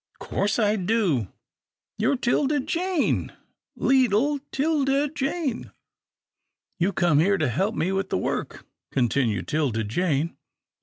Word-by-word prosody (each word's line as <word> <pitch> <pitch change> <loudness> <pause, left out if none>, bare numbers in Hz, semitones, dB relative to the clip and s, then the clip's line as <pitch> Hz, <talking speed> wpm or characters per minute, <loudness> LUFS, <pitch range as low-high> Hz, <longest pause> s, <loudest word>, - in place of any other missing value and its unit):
" - - -34
Course 200 0 -1
I 215 -2 +2
do 185 - +1 0.4
— - - -68
you're 225 +6 +2
'Tilda 280 +4 +1
Jane, 340 +3 -1 0.4
leetle 265 +2 +2
'Tilda 285 -1 +1
Jane." 280 -2 -3 0.5
" - - -56
You 175 - +3
have 200 - -3
come 170 -5 +3
here 200 +5 +3
to 155 -5 +1
help 190 - 0
me 175 - 0
do 195 0 +1
the - - -2
work," 90 - -3 0.3
continued 120 -6 0
'Tilda 135 -8 0
Jane. 155 - -1
200 Hz, 140 wpm, -25 LUFS, -, 0.5 s, You